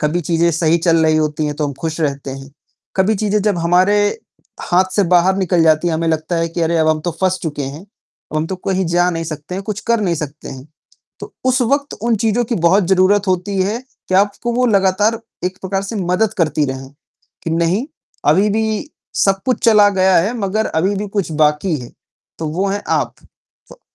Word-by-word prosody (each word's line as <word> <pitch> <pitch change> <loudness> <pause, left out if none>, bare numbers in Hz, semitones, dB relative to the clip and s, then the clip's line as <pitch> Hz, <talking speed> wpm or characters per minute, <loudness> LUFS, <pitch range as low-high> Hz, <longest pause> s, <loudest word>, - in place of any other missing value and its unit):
कभी 155 +3 0
चीज़ें 170 +1 +1
सही 165 +1 +2
चल 165 -1 +2
रही 155 0 +3
होती 155 0 0
है 150 - -2
तो 150 0 -1
हम 140 - -4
खुश 160 0 -3
रहते 140 -3 -2
हैं, 135 +1 -9 0.5
कभी 195 +3 +3
चीज़ें 210 +1 0
जब 205 -4 +1
हमारे 180 +4 +3 0.7
हाथ 180 +2 +4
से 205 - +3
बाहर 180 +2 +4
निकल 180 -3 +2
जाती 160 +1 +3
है, 165 - 0
हमें 165 +1 -1
लगता 160 +2 -1
है 165 0 0
कि 165 +1 -5
अरे 165 +1 +1
अब 160 0 +3
हम 155 0 +1
तो 175 - -2
फस 185 0 +2
चुके 150 -3 -3
हैं। 140 +3 -6
अब 200 -6 -13
हम 155 +1 0
तो 190 - -4
कहीं 190 +1 -1
जा 175 +1 +2
नहीं 165 -1 -3
सकते 155 +2 -6
हैं, 195 - -4
कुछ 210 0 -4
कर 235 -1 +2
नहीं 180 -5 0
सकते 150 -1 -6
हैं, 130 0 -9 0.5
तो - - -9
उस 260 0 +2
वक़्त 280 +4 0
उन 235 -1 +2
चीज़ों 225 +2 +1
की 235 - -2
बहुत 180 +1 +3
ज़रूरत 195 +2 +3
होती 185 +2 -1
है 205 +5 -1 0.3
कि 185 - 0
आपको 205 +5 +1
वो 250 +1 +2
लगातार 205 +1 +2 0.2
एक 185 +1 -3
प्रकार 195 +1 -2
से 200 +3 -5
मदद 190 +3 0
करती 155 -2 +1
रहें, 130 0 -6 0.5
कि 165 - -2
नहीं, 170 +9 0 0.4
अभी 190 +8 +4
भी 220 +5 -1 0.3
सब 195 -1 +2
कुछ 255 - +1
चला 210 -3 +6
गया 190 0 +4
है, 200 +8 0
मगर 210 +2 -1
अभी 185 +6 0
भी 205 +1 -4
कुछ 195 -4 -2
बाकी 150 +3 +1
है, 120 - -10 0.5
तो 160 - -3
वो 185 +6 -1
हैं 200 +1 -2
आप। - - 0 0.5
तो, - - -15
180 Hz, 215 wpm, -17 LUFS, 160-205 Hz, 0.7 s, चला